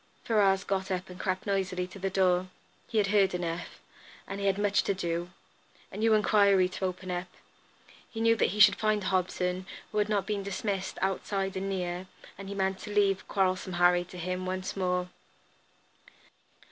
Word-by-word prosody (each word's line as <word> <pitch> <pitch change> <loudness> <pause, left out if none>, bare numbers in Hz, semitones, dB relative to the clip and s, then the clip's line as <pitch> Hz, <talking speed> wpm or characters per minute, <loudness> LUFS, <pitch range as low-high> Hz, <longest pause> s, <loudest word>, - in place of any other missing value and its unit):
Ferrars 195 -3 +3
got 190 -1 -2
up 185 0 -3
and 180 - -11
crept 185 -1 -2
noiselessly 190 -2 -1
to 185 +2 -11
the 195 +1 -1
door. 185 -1 +2 0.4
He 225 - -3
had 210 - +4
heard 195 -3 +4
enough, 175 -1 -4 0.5
and 195 - -5
he 200 - 0
had 195 0 +2
much 205 0 +2
to 200 - +1
do. 170 -1 -2 0.6
A 195 - -8
new 220 +1 +4
enquiry 200 -3 +4
to 190 - -3
open 185 0 -4
up. 180 +1 -3 0.8
He 225 - -7
knew 230 0 +4
that - - +2
he 210 - -4
should 205 0 +8
find 215 -1 +1
Hobson, 185 -1 -1 0.2
who 210 - 0
had 210 0 +1
not 205 -2 +1
been 210 -2 -2
dismissed, 195 0 -3
outside 195 0 -1
and 195 +1 -2
near, 180 -1 -3 0.3
and 195 +1 -9
he 200 - -5
meant 190 -1 0
to 210 - -8
leave 200 -2 +2
"Quarrelsome 185 -1 0
Harry" 175 0 +4
to 180 - -11
him 180 +1 -3
once 185 0 -3
more. 180 -1 0
190 Hz, 185 wpm, -29 LUFS, 185-200 Hz, 0.8 s, should